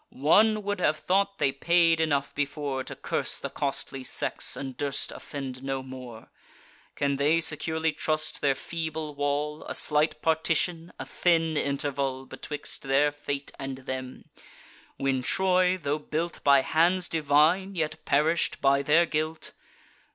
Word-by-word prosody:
One 210 +10 +3
would 205 -1 -2
have 155 -3 +2
thought 195 +3 +1
they 135 - +2
paid 165 +3 +3
enough 145 -3 0
before, 145 -2 -2
To - - -7
curse - - -2
the - - -6
costly 135 -1 -3
sex, - - -2
and 135 -2 -5
durst 140 0 -3
offend 135 -3 -7
no 135 -1 -3
more. 125 -4 -10 0.6
Can 140 -1 0
they 150 +4 +3
securely 160 0 0
trust 155 0 -2
their 140 -2 +3
feeble 160 -2 -4
wall, 145 +2 -2
A - - -5
slight 155 +1 +2
partition, 165 +1 0
a - - -6
thin 165 -2 +1
interval, 140 -2 -1
Betwixt 150 +2 -7
their 140 +2 +2
fate 145 -1 -5
and 135 -1 -5
them; 130 -1 -6 0.7
when 135 -1 0
Troy, 185 +5 +2
tho' 145 -3 -2
built 160 +3 -4
By 140 -1 +6
hands 170 +5 +2
divine, 160 +5 +2
yet 155 -1 -3
perish'd 155 +4 +1
by 140 0 +3
their 155 +5 +4
guilt? 155 0 -3
150 Hz, 145 wpm, -27 LUFS, 140-165 Hz, 0.7 s, By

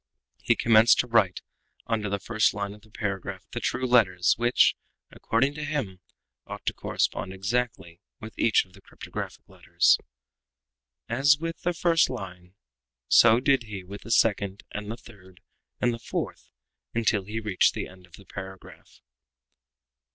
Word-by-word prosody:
He - - +2
commenced 115 0 +5
to 125 - -9
write 105 -6 +2 0.4
under 110 -3 -1
the 100 - -1
first 110 +2 +1
line 100 -1 -3
of 105 - -15
the 110 - -21
paragraph 100 -3 -5
the - - -4
true 130 - -1
letters, 110 -8 +4
which, 120 +2 +3 0.4
according 135 +5 0
to 150 0 -6
him, 135 -12 -3 0.5
ought - - -8
to - - 0
correspond - - -2
exactly 100 -4 -3 0.2
with 110 +1 -9
each 115 - +3
of 90 - -26
the - - -17
cryptographic - - -8
letters. - - +2 1.1
As 140 +5 +3
with 165 +2 -5
the 175 - 0
first 165 -1 +3
line 90 -6 -8 0.5
so 115 0 +6
did 135 -2 +2
he 105 -3 -7
with 100 +3 -10
the - - -11
second, 100 -3 +1
and 105 0 -6
the 115 - -5
third, 95 -5 -17 0.4
and 120 -1 +1
the 115 - -6
fourth, - - -5 0.5
until 110 -4 +1
he 110 +3 -4
reached 105 -4 +2
the - - -4
end 90 -1 -16
of 85 - -30
the 100 - -14
paragraph. 95 -1 -11
110 Hz, 160 wpm, -26 LUFS, 95-120 Hz, 1.1 s, so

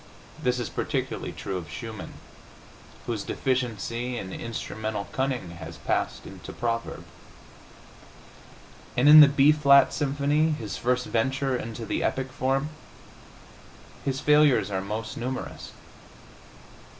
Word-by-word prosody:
This 125 0 +1
is 120 - -2
particularly - - -3
true 95 -1 -4
of 85 -4 -7
Schumann, 110 +6 -7 0.9
whose 115 -3 -2
deficiency 120 -1 -2
in 95 -4 -6
instrumental 110 -3 -4
cunning 130 -9 -2
has 80 -1 -9
passed - - -2
into - - -9
proverb. 115 -1 -3 1.9
And 125 +4 +4
in 155 +1 +11
the 150 - +11
B 140 +1 +5
flat 140 -2 +5
symphony, 145 +2 +1
his 110 -8 -5
first 125 +1 0
venture 135 +3 0
into 115 -1 -5
the - - -2
epic 130 0 -1
form, 135 +2 0 1.3
his 135 -1 -1
failures 150 -6 +4
are 95 -1 -1
most 110 +3 -5
numerous. 125 +2 -5
125 Hz, 115 wpm, -26 LUFS, 110-135 Hz, 1.9 s, in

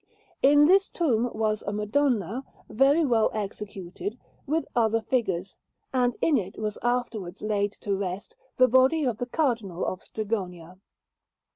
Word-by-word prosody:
In 290 +2 +6
this 385 +4 +4
tomb 245 -8 +1
was 215 -1 -1
a - - 0
Madonna, 220 - 0 0.2
very 275 +8 +3
well 230 -5 +3
executed, 200 0 -5 0.3
with 320 +3 0
other 225 -1 +3
figures; 195 -6 -2 0.4
and 245 -2 +2
in 305 -4 +3
it 190 -1 -7
was 210 -1 -3
afterwards 235 -7 -2
laid 205 -1 0
to 200 -1 -3
rest 195 - -5 0.2
the 255 - +6
body 260 +6 +4
of 240 -5 -1
the 245 - -3
Cardinal 230 - -1
of 185 - -3
Strigonia. 185 -5 -5
220 Hz, 140 wpm, -26 LUFS, 200-260 Hz, 0.4 s, In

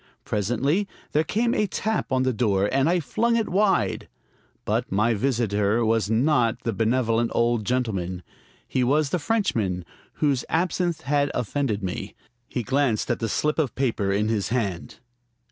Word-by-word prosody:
Presently 120 - 0 0.2
there 155 - +2
came 230 +7 0
a 210 - +1
tap 220 -2 -2
on 130 0 +2
the 130 0 +1
door, 100 -3 +1
and 135 +3 +2
I 180 +1 +3
flung 230 +9 0
it 225 -2 +1
wide. 195 0 +1 0.6
But - - -1
my 110 +4 +2
visitor 115 -2 +1
was 110 -2 +1
not 120 0 +2
the 115 - -1
benevolent 115 +2 +1
old 115 -2 +1
gentleman. 95 -8 -2 0.4
He 130 - 0
was 145 +3 +2
the 180 - +1
Frenchman 115 - 0 0.3
whose 140 -5 +1
absinthe 175 0 0
had 145 +2 +1
offended 115 -4 -1
me. 90 -1 -4 0.3
He 125 - -3
glanced 130 -3 +1
at 120 - -1
the 115 - -2
slip 150 +8 0
of 145 -6 0
paper 115 -7 0
in 105 +2 +1
his 110 -3 -1
hand. 100 -8 -2
125 Hz, 160 wpm, -24 LUFS, 110-150 Hz, 0.6 s, I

